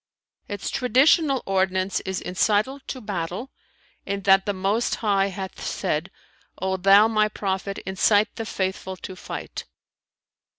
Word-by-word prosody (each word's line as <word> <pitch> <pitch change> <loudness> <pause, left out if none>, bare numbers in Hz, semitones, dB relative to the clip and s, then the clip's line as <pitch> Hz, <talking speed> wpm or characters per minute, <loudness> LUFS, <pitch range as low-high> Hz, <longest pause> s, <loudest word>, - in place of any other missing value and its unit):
Its 205 -2 -4
traditional 275 +3 +3
ordinance 190 0 +1
is 190 -1 -4
incital 210 +8 +1
to 260 - -5
battle, 200 +2 -4 0.5
in 200 0 -3
that 195 0 +4
the - - +2 0.2
Most 225 +4 +1
High 200 -3 +1
hath 190 -1 -7
said, - - -2 0.5
'O 190 0 -1
thou 195 +3 +6
my 215 -1 +2
Prophet, 195 -1 -3
incite 205 +3 +2
the 225 - -5
faithful 190 -2 -3
to 185 - -8
fight!' - - -7
200 Hz, 130 wpm, -24 LUFS, 190-215 Hz, 0.5 s, thou